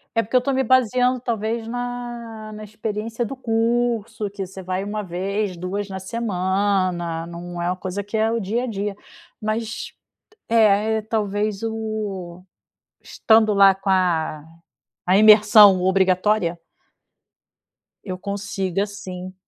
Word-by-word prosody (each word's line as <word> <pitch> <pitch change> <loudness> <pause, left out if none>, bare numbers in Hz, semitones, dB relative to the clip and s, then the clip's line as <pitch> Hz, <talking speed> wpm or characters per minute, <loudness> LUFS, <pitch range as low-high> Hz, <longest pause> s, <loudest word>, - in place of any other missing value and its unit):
É, 230 - +4
porque 230 +5 -5
eu - - +7
estou 270 +2 -1
me 265 0 +1
baseando 255 0 +3
talvez 225 -1 -2
na 245 -1 -5 0.2
na 215 0 -8
experiência 215 +2 -4
do 270 - -6
curso, 230 -2 -1
que 195 -1 -5
você 190 +1 -10
vai 185 +1 -3
uma 210 +1 -4
vez, 190 +1 -3
2 195 +3 -4
na 190 - -5
semana, 190 -4 -1
não 175 +1 -8
é 170 - -1
uma 180 - -1
coisa 185 +2 -5
que 205 +3 -7
é 220 +1 +2
o 230 - 0
dia 225 +4 -1
a - - -3
dia. 205 -2 -3 0.5
Mas 215 +1 -3 0.6
é 220 -1 +3
é - - -4
talvez 210 -1 -2
o 215 -6 -4 0.6
estando 220 -1 +3
lá 195 -1 +6
com 195 +1 -7
a 165 -5 +1 0.6
a 185 +2 +5
imersão 210 -2 +7
obrigatória 190 -1 +2 1.5
eu 185 -3 -5
consiga, 200 -1 -2
sim. 185 -2 -8
205 Hz, 140 wpm, -22 LUFS, 190-225 Hz, 1.5 s, eu